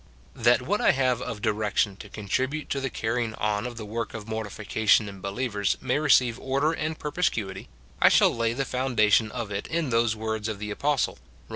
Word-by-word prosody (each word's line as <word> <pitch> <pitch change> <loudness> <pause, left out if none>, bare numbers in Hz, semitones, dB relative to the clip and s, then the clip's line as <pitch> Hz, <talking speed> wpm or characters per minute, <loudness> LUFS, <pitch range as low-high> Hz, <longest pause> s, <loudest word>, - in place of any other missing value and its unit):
That 120 +2 +3
what 205 +10 0
I - - +5
have 130 -2 +1
of 105 -2 -5
dh'ection 105 -1 +1
to 105 - -10
contribute 130 +9 -2
to 140 - 0
the 135 - -1
carrying 115 -1 -2
on 105 +2 -1
of 120 -2 -8
the 110 - -6
work 115 +2 -4
of 110 -1 -7
mortification 110 0 +1
in 100 -1 -9
believers 100 0 -1
may 130 +2 0
receive 125 -5 +3
order 140 +4 +1
and 155 0 -3
perspicuity, 115 - -2 0.3
I - - +8
shall - - +4
lay 115 0 0
the 135 +3 -2
foundation 115 -5 +2
of 120 -4 -5
it 100 0 -3
in 160 -5 -1
those 115 -1 +2
words 110 0 -3
of 110 -2 -3
the 105 +1 -5
apostle, 140 - 0
Rom. - - -28
115 Hz, 195 wpm, -26 LUFS, 105-130 Hz, 0.3 s, I